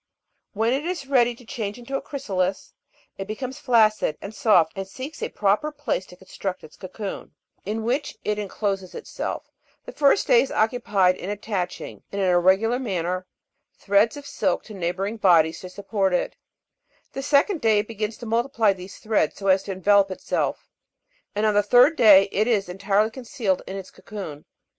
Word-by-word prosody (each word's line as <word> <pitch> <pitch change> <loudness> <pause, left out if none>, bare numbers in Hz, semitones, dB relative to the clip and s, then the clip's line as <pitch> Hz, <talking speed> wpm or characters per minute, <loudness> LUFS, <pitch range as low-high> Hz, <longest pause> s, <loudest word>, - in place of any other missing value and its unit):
When 225 +3 +1
it 275 +2 -1
is 345 -4 -3
ready 245 -3 +3
to 245 - -17
change 220 -4 -5
into 245 +3 -6
a - - -1
chrysalis, 195 -10 -3 0.5
it 195 - -4
becomes 255 +5 -5
flaccid 215 - +3
and 200 - -8
soft, 195 -7 +3
and 195 -1 -5
seeks 265 +9 -8
a - - -2
proper 210 +9 +1
place 290 -10 -3
to - - -13
construct 190 0 -6
its 155 - -13
cocoon, 195 +2 -7 0.3
in 220 +2 -2
which 265 +6 -2
it 210 0 0
encloses 195 -2 -3
itself; - - -5 0.3
the - - -7
first 285 +6 +3
day - - +5
is 275 - -3
occupied 205 -5 +2
in 185 - -6
attaching, 205 -3 -4
in 200 - -4
an 195 - +1
irregular 190 +7 +3
manner, 185 -5 -2 0.5
threads 205 +5 +2
of 285 - -9
silk - - -1
to 215 - -11
neighbouring 195 +4 -3
bodies 165 -5 +4
to 185 - -9
support 195 -1 -1
it; - - -2 0.8
the 270 - -4
second 290 +6 +2
day 220 -2 +4
it 205 +1 0
begins 215 -1 -4
to 240 - -9
multiply 230 -2 +2
these 185 0 -11
threads 215 -8 0
so 195 -1 -2
as 190 0 +5
to 200 - -6
envelope 200 +1 +3
itself; 185 - -3 0.6
and 210 +1 +1
on 215 - +3
the 205 - +4
third 245 - +5
day 205 -6 +7
it 215 +3 +1
is 210 -6 +1
entirely 200 +4 +1
concealed 235 -6 -2
in 190 - -5
its 190 -1 -9
cocoon. 175 -9 -9
210 Hz, 180 wpm, -24 LUFS, 190-240 Hz, 0.8 s, day